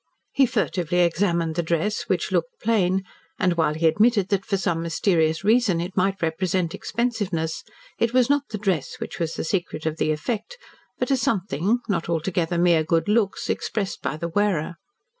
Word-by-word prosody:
He 270 -2 +4
furtively 180 -7 0
examined 170 -1 +1
the 170 - 0
dress 170 +6 -1
which - - 0
looked - - -1
plain, 190 -4 +1 0.3
and 180 -1 +2
while 160 -3 +1
he 160 +1 -1
admitted 205 +4 +3
that 195 -2 +1
for 200 - +1
some 170 -3 -1
mysterious 165 -1 +1
reason 215 -4 +3
it 175 +2 -4
might 195 0 +1
represent 170 +1 0
expensiveness, 205 -9 -2 0.4
it 230 - +2
was 250 -1 +4
not 285 0 +1
the 215 - -4
dress 190 -9 -1
which - - -7
was 165 -1 -2
the - - -3
secret 170 -2 -2
of 160 0 -1
the 155 - +1
effect, 215 - -3 0.4
but - - -1
a - - +5
something, 205 - 0
not 175 -5 -1
altogether 170 +1 0
mere 170 -2 +4
good 165 +3 +1
looks, 210 -2 +1
expressed 200 -4 -2
by 155 - -3
the 170 +1 -3
wearer. 175 -3 0
180 Hz, 180 wpm, -24 LUFS, 165-210 Hz, 0.4 s, a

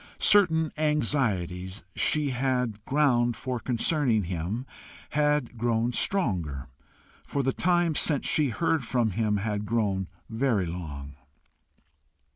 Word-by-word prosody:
Certain 160 -6 +4
anxieties 105 - -1
she 150 -3 +1
had 125 -4 -1
ground 125 -5 +2
for 125 +2 -4
concerning 125 -2 +1
him 90 +8 -3 0.5
had 150 -5 0
grown 120 +1 0
stronger, 85 - 0 0.6
for 140 - -1
the 135 0 0
time 175 -2 +2
since 150 -1 +1
she 150 -3 +2
heard 165 +2 0
from 120 -2 0
him 105 0 0
had 105 0 -2
grown 100 -4 -1 0.2
very 115 -4 0
long. 70 -5 -7
120 Hz, 110 wpm, -27 LUFS, 100-150 Hz, 0.6 s, Certain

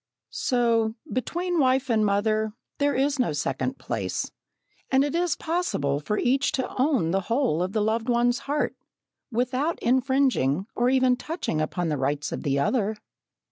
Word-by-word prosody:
So, 230 -3 +1 0.2
between 345 +7 -1
wife 265 -1 +3
and 225 -3 +2
mother 215 +1 +1 0.3
there 285 0 +2
is 280 +1 +1
no 240 -11 +1
second 145 - -2
place, - - -3 0.6
and 265 +1 +4
it 285 - -1
is 345 0 +1
possible 315 - -1
for 210 +8 -2
each 270 +3 +2
to 260 - 0
own 255 - +2
the 195 - +2
whole 230 - +1
of 185 +2 -2
the 215 - +1
loved 225 +2 0
one's 240 +1 +2
heart, 295 +1 0 0.6
without 255 +7 0
infringing 255 - +2
or 245 +1 +2
even 255 -1 +3
touching 255 - -3
upon 170 +2 -1
the 150 - 0
rights 140 +2 -1
of - - -4
the 140 -1 0
other. 210 - +1
245 Hz, 160 wpm, -26 LUFS, 200-270 Hz, 0.6 s, and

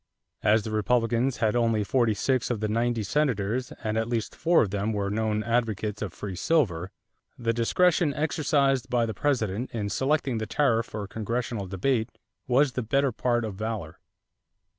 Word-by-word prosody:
As 105 +1 +3
the 110 - -5
Republicans 120 +3 +1
had 110 0 +1
only 115 -3 +2
forty 115 0 +2
six 130 +4 0
of 120 -4 -1
the 110 - -1
ninety 115 +1 0
Senators, 125 -2 0
and 110 0 0
at 110 - -1
least 115 -2 -2
four 170 0 +4
of 100 - -3
them 105 +2 -1
were 100 -1 -1
known 110 0 0
advocates 110 -3 -1
of 105 -4 -3
free 95 +1 -6
silver, 95 - +1 0.5
the 115 -1 0
discretion 160 +7 +2
exercised 140 -4 +1
by 120 -2 +2
the 110 - -3
President 120 -2 -1
in 105 -3 -3
selecting 135 +1 0
the 110 - -3
tariff 115 -2 +1
for 105 -2 -5
congressional 115 -1 -3
debate 110 +5 0 0.4
was 135 +2 +3
the 125 - -2
better 135 +4 +1
part 120 0 0
of 110 - -4
valor. 105 -5 -5
115 Hz, 170 wpm, -27 LUFS, 105-125 Hz, 0.5 s, four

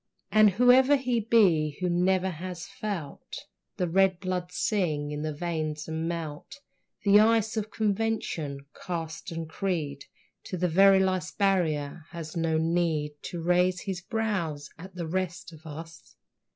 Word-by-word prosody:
And 215 -1 +7
whoever 250 +7 +5
he 250 -3 0
be 180 -10 +3
who 180 - 0
never 185 +2 +2
has 175 +1 -6
felt 200 -7 -6 0.3
The 180 - 0
red 190 +1 +3
blood 180 -2 -3
sing 155 -9 -1
in 150 0 -4
the 155 0 -2
veins 155 -1 -3
and 160 +1 -3
melt 165 - -5 0.5
The 200 +1 +7
ice 220 0 +3
of 215 -1 -2
convention, 200 -10 -2 0.2
caste 165 +1 -5
and 165 -1 -4
creed, 155 -6 -3 0.4
To 185 - -4
the 180 +1 +1
very 195 +3 +6
last 185 -2 0
barrier, 165 -6 0
has 165 -2 -8
no 165 -1 +1
need 160 -2 0
To 170 -2 -5
raise 180 +1 +2
his 190 -3 -4
brows 180 -10 -2
at 185 +3 -12
the 175 -2 -4
rest 175 0 -3
of 160 +1 -13
us. 165 +2 -10
175 Hz, 150 wpm, -28 LUFS, 160-195 Hz, 0.5 s, And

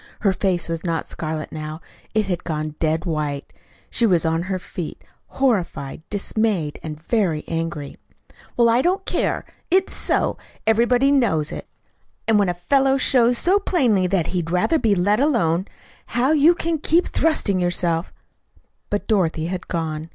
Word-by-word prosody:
Her 195 -2 +3
face 185 -3 0
was 165 -1 -4
not 165 -2 -1
scarlet 155 -1 -5
now. 155 0 -6 0.4
It 215 -1 +2
had 180 -3 -3
gone 155 -2 -3
dead 160 +1 0
white. 150 -4 -3 0.4
She 235 - +2
was 175 -5 +2
on 165 +1 +1
her 185 +1 -2
feet, 175 -2 -7 0.3
horrified, 185 - -1
dismayed, 205 -6 -1
and 155 -1 -7
very 170 -4 0
angry. 165 -3 -4 0.6
"Well, 235 -1 +5
I 230 +2 +4
don't 375 +4 0
care. - - -1 0.2
It's 375 +2 +2
so. - - 0 0.3
Everybody 240 +5 +3
knows 195 - +2
it. - - -7 0.6
And 220 -2 +4
when 200 -3 +2
a 175 - -1
fellow 270 +9 +2
shows 245 -2 +4
so 380 +9 +3
plainly 245 - +2
that 180 -3 +1
he'd 175 -3 -1
rather 180 - +2
be 215 -6 +2
let 200 +4 +2
alone, 195 - +1 0.5
how 255 +4 +3
you 315 +3 +5
can 330 -2 -1
keep 335 +4 +2
thrusting 270 -12 +1
yourself 175 -1 0 0.4
" - - -38
But 205 - -2
Dorothy 170 -6 +1
had 180 - -5
gone. 160 -2 -3
185 Hz, 160 wpm, -22 LUFS, 165-240 Hz, 0.6 s, Well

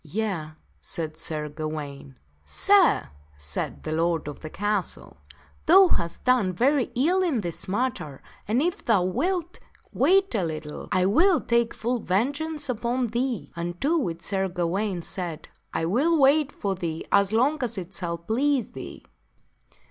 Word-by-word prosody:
"Yea," 170 -3 -3 0.3
said 155 -2 -5
Sir 155 -1 -3
Gawaine. 145 -3 -6 0.3
"Sir," 70 -2 +3 0.3
said 75 0 -4
the 155 - -4
lord 165 0 0
of 145 - -6
the 155 - -7
castle, 205 +1 -2 0.5
"thou 375 +3 +8
hast 170 0 -1
done 245 -8 +3
very 260 +6 +3
ill 340 +10 +3
in 315 -11 +1
this 170 -4 -4
matter, 200 - -2 0.2
and 235 +7 +2
if 350 +1 -1
thou 220 -8 +3
wilt 340 - -1 0.3
wait 390 +1 +3
a 205 -5 +1
little 155 -2 -5
I 185 - +3
will 330 - +4
take 235 -1 +1
full 240 +2 -1
vengeance 285 - -1
upon 245 0 -1
thee." 240 0 -2
Unto 175 - -1
which 170 - -2
Sir 195 0 0
Gawaine 180 +1 -2
said, 175 -4 -5
" - - -45
I 165 - -1
will 280 - +2
wait 290 +1 +4
for 200 -1 -2
thee 170 -3 -4
as 200 0 +4
long 270 +7 +2
as 235 -3 -2
it 185 0 -6
shall 170 -3 -3
please 245 - 0
thee." - - -9
205 Hz, 155 wpm, -25 LUFS, 170-265 Hz, 0.5 s, thou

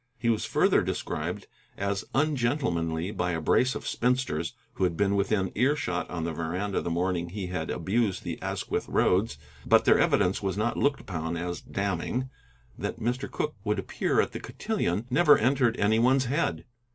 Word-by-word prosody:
He 115 -1 +1
was 110 - -1
further - - +3
described - - -3 0.3
as 100 -1 -1
ungentlemanly 120 - 0
by 90 -4 -1
a 80 - -1
brace 125 - +2
of - - -6
spinsters 120 -8 0 0.2
who - - -2
had 85 -3 +1
been 100 0 +2
within 100 -1 +1
earshot 125 -8 0
on 85 -2 -3
the 85 0 -2
veranda 90 +5 -2
the - - -3
morning 85 0 -1
he 100 +1 -5
had 90 -3 -3
abused 95 +2 0
the - - -5
Asquith - - -3
roads, 95 -2 +2 0.3
but - - +4
their - - +5
evidence 90 +2 +2
was 95 -1 -2
not 115 +3 0
looked 140 0 +1
upon 80 -2 -4
as 85 +1 -4
damning. 100 +7 -2 0.5
That - - -4
Mr. 120 +3 -2
Cooke 150 -7 -3
would 105 -1 0
appear 95 - 0
at - - +2
the - - -5
cotillon 95 +7 -2
never 150 +2 +6
entered 130 0 +2
any 110 +2 +3
one's 130 +2 +4
head. 105 - -1
100 Hz, 175 wpm, -28 LUFS, 90-120 Hz, 0.5 s, never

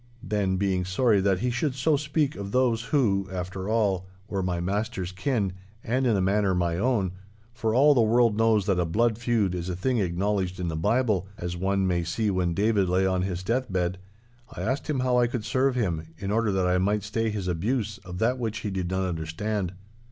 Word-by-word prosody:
Then, 100 -5 0
being 95 -1 0
sorry 100 +3 +2
that 95 -1 +1
he 125 - +1
should 130 +2 -1
so 145 +3 +2
speak 145 0 0
of 100 0 -6
those 120 -2 +2
who, 100 -10 +1
after 95 +1 -4
all, 100 -5 +1 0.2
were 100 -2 -2
my 90 -2 -1
master's 95 0 -2
kin 100 0 -1 0.3
and 130 +3 0
in 110 -4 +3
a - - +1
manner 95 0 +2
my 85 -1 0
own—for 110 +1 -2
all 145 +3 +6
the 125 - +4
world 115 0 +3
knows 110 -2 +3
that 95 -3 +1
a 90 - +2
blood 110 +6 +1
feud 115 -6 +1
is 90 0 -3
a 90 - -2
thing 120 +7 0
acknowledged 95 0 -1
in 90 -1 -2
the 80 - -3
Bible, 105 +2 +1
as 90 0 -4
one 95 +2 0
may 90 -2 +1
see 105 +5 -1
when 90 -2 0
David 100 -2 +2
lay 95 +1 +2
on 95 -1 +1
his 90 -1 -3
deathbed—I 100 +1 -4
asked 130 +9 -2
him 140 -4 0
how 125 -1 +2
I 120 - +4
could 120 -2 -4
serve 130 +2 +1
him, 85 -9 -1
in 100 0 -4
order 115 -1 +2
that 95 -1 +1
I 90 0 +2
might 100 +2 +1
stay 110 +2 -1
his 105 -3 -3
abuse 105 +4 -1
of 90 -2 -8
that 120 +5 +1
which 110 -2 -3
he 105 - -3
did 95 -2 -2
not 95 0 0
understand. 90 +4 -2
100 Hz, 210 wpm, -26 LUFS, 95-115 Hz, 0.3 s, all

